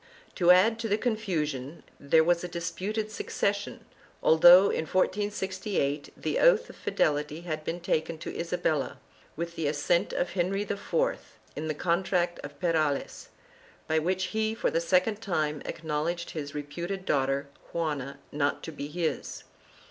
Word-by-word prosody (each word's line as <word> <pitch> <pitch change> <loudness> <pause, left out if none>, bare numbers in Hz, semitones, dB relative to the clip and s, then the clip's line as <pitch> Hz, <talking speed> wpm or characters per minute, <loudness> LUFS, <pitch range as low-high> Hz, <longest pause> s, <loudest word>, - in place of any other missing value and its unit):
To 175 -2 +2
add 205 +6 +6
to 230 - -2
the 205 - +3
confusion 170 - -2 0.2
there 160 +3 +4
was 175 +1 +2
a - - -2
disputed 190 +5 -3
suc - - -6
cession, 200 +1 -1 0.4
although, 175 +4 +8
in 160 - -1
1468, 190 -5 -1
the - - -1
oath - - +4
of - - -17
fidelity 150 +1 0
had 155 -3 -4
been 165 +3 -3
taken 165 -1 -1
to - - -7
Isabella, 165 -4 -1 0.4
with 170 +1 -4
the 160 - -1
assent 150 +4 +1
of 175 - -1
Henry 190 +2 0
IV, 205 -1 -5 0.6
in 155 - -4
the 155 - -2
Contract 175 +1 0
of 145 0 -9
Perales, 155 -5 0 0.6
by 160 0 +2
which 185 +4 0
he, 220 0 0
for - - 0
the 165 - +1
second 185 +5 +2
time, 155 -7 -1
acknowledged 165 +2 -3
his 145 -3 -6
reputed 170 +7 -4
daughter 135 -1 +1 0.2
Juana 145 -5 -2
not 145 0 0
to 165 - -5
be 145 -1 -6
his. 165 +1 -3
170 Hz, 150 wpm, -28 LUFS, 150-190 Hz, 0.6 s, although